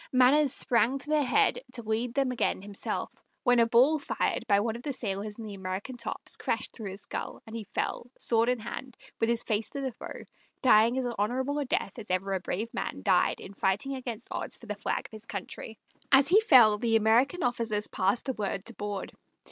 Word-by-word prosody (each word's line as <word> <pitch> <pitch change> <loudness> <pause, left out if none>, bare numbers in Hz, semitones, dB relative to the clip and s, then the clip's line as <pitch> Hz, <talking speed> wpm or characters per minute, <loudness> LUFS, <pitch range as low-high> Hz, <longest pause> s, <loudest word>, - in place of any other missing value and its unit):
Manners 265 +3 +5
sprang 250 0 +2
to 275 +2 -9
their 305 -1 +4
head 265 - +3
to 235 - -5
lead 225 +2 -1
them 270 -2 +2
again 235 -5 -1
himself, 200 -1 -4 0.3
when 245 -2 +4
a 230 - +5
ball 260 +7 +5
fired 280 - -1
by 200 -2 +4
one 220 +2 -1
of 235 - -7
the 280 +2 -3
sailors 210 -3 -3
in 230 - -7
the 210 -2 -7
American 190 +6 -5
tops 230 -1 -5
crashed - - -2
through 215 -4 -6
his 195 +2 -7
skull, - - -5
and 220 - -9
he 225 -2 -5
fell, 240 - -3
sword 230 0 +2
in 250 - +2
hand, 235 +3 -7 0.2
with 225 - +2
his 235 0 +1
face 215 -1 -1
to 280 - -6
the 265 -1 -2
foe, 235 - -9 0.4
dying 235 0 +5
as 260 - 0
honorable 260 +7 0
a 290 - -1
death 235 -3 -2
as 215 - -9
ever 190 +2 0
a 190 - 0
brave 215 +6 -3
man - - -4
died - - +3
in 195 - -9
fighting 200 +8 0
against 245 -3 -5
odds - - -2
for - - -14
the 210 - -3
flag 205 - -3
of - - -11
his 220 +1 -9
country. 205 +2 -6 0.3
As 275 0 +7
he 410 +5 +6
fell 235 - +7
the 225 0 +1
American 235 - +3
officers 230 -4 -1
passed 195 +4 0
the 265 - -1
word 195 -3 -3
to 235 - -3
board. 205 -2 -5
230 Hz, 220 wpm, -29 LUFS, 210-255 Hz, 0.4 s, As